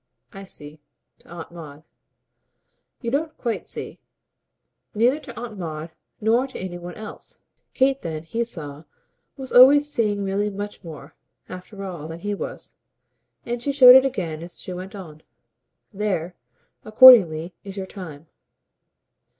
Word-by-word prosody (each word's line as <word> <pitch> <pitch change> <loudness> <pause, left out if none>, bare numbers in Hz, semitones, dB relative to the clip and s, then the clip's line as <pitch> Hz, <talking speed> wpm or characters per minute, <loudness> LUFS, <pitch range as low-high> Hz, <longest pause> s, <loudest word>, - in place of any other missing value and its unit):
"I 195 0 -9
see. 150 -4 -10 0.4
To - - -23
Aunt 170 -1 -9
Maud." 155 -3 -11 1.2
"You 235 -2 -3
don't 310 +3 -2
quite 235 -3 -3
see. - - -8 1.0
Neither 245 +7 +2
to 245 -6 -10
Aunt 225 -4 -8
Maud 160 -1 -6 0.3
nor 230 +5 +2
to 265 - -10
any 180 -1 -6
one 175 0 -9
else." 215 0 -10 0.4
Kate 270 +1 +2
then, 160 -2 -5
he 230 +8 -2
saw, 155 -9 -7 0.5
was 265 -1 -7
always 280 +4 +7
seeing 205 -3 0
Milly 200 +2 -1
much 205 0 -7
more, 155 -3 -11 0.3
after 185 +2 -9
all, 175 -5 -7
than 165 +1 -9
he 205 +2 -3
was; 200 - -7 0.7
and 240 0 -4
she 280 - -1
showed 255 -3 +9
it 265 - +8
again 170 -12 -3
as 170 +1 -9
she 185 - -7
went 185 +3 -8
on. 160 -6 -11 0.7
"THERE, 190 -4 -2 0.5
accordingly, 205 -8 +7
is 195 -1 -9
your 190 - -4
time." 165 -6 -10
195 Hz, 145 wpm, -23 LUFS, 165-235 Hz, 1.2 s, showed